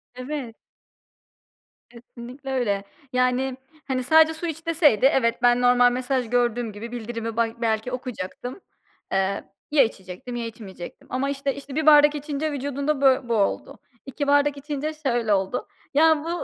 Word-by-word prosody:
Evet. 255 -2 -5 1.3
Kesinlikle 245 +3 -10
öyle. 210 -7 0 0.3
Yani, 255 +1 +1 0.3
hani, 255 -1 -1
sadece 320 +4 +5
su 320 +2 -4
iç 325 +1 -6
deseydi 300 - +3
evet 240 -4 +2
ben, 245 0 +4
normal 245 0 +5
mesaj 255 -1 -1
gördüğüm 240 -1 0
gibi 215 +3 -8
bildirimi 230 -1 -5
bay 230 -1 +1
belki 220 +1 0
okuyacaktım, 250 - -6 0.5
eee, 195 +1 0 0.3
ya 295 -2 +6
içecektim 195 +1 -6
ya 235 -1 -3
içmeyecektim. 210 -6 -10
Ama, 265 +2 -1
işte, 275 0 -2
işte, 280 -1 -9
1 315 0 0
bardak 295 -1 +7
içince 295 +1 -3
vücudunda 280 +1 -2
bö 265 -2 +3
bu - - +1
oldu. 200 -2 -1 0.3
2 280 +1 -4
bardak 285 0 +3
içince 295 +2 -4
şöyle 240 -8 0
oldu. 195 +5 -1 0.3
Ya, 315 +1 +4
bu 330 - -5
255 Hz, 150 wpm, -24 LUFS, 235-285 Hz, 1.3 s, bardak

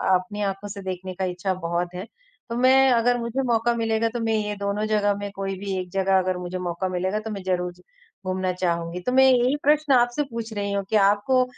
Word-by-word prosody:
अपनी 185 +3 -3
आँखों 195 0 -2
से 200 0 -7
देखने 185 0 -5
का 190 - -2
इच्छा 180 +1 -2
बहुत 175 0 -3
है। 185 - -5 0.4
तो 235 - -3
मैं 265 +1 +5
अगर 245 +1 +3
मुझे 235 +3 -2
मौका 235 0 +2
मिलेगा 225 0 +1
तो 240 - -2
मैं 225 -1 0
ये 210 -1 -1
दोनों 200 +1 -2
जगह 205 -1 +2
में 205 0 -5
कोई 195 0 -3
भी 195 -1 -3
एक 180 -1 -6
जगह 190 0 +2
अगर 185 -1 -1
मुझे 180 +1 -5
मौका 175 +1 -2
मिलेगा 185 +3 -1
तो 220 +1 -6
मैं 195 -2 -6
ज़रूर 180 -1 -1
ज 180 - -22 0.4
घूमना 185 0 -1
चाहूँगी। 170 -1 -2
तो 250 - -2
मैं 265 +1 +6
यही 250 +2 +3
प्रश्न 295 0 +3
आपसे 245 +3 +3
पूछ 230 -1 -5
रही 200 -1 -2
हूँ 200 - 0
कि 220 - 0
आपको, 205 +6 +4
200 Hz, 230 wpm, -24 LUFS, 185-230 Hz, 0.4 s, मैं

